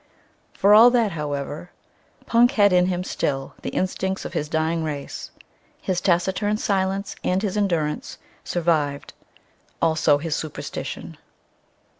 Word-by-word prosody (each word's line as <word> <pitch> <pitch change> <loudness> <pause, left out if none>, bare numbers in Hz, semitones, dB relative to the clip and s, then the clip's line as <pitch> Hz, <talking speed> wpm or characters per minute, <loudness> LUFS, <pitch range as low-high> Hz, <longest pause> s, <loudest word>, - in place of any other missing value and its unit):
For 200 +1 +4
all 225 +3 +9
that, 235 -4 +2
however, 150 +1 -4 0.6
Punk 240 +3 +4
had 205 -5 +4
in 180 0 +4
him 180 -1 -1
still 135 -6 -2
the - - -4
instincts 190 +1 -2
of - - -6
his 150 - -2
dying 160 +1 0
race; 145 -3 -5 0.5
his 180 -2 -2
taciturn 190 +3 +1
silence 195 -1 -1
and 185 +3 0
his 200 -2 -1
endurance 170 -7 -1 0.3
survived; 155 -5 -1 0.7
also 160 -2 +3
his 160 +1 -2
superstition. 155 -2 -6
180 Hz, 125 wpm, -23 LUFS, 155-200 Hz, 0.7 s, all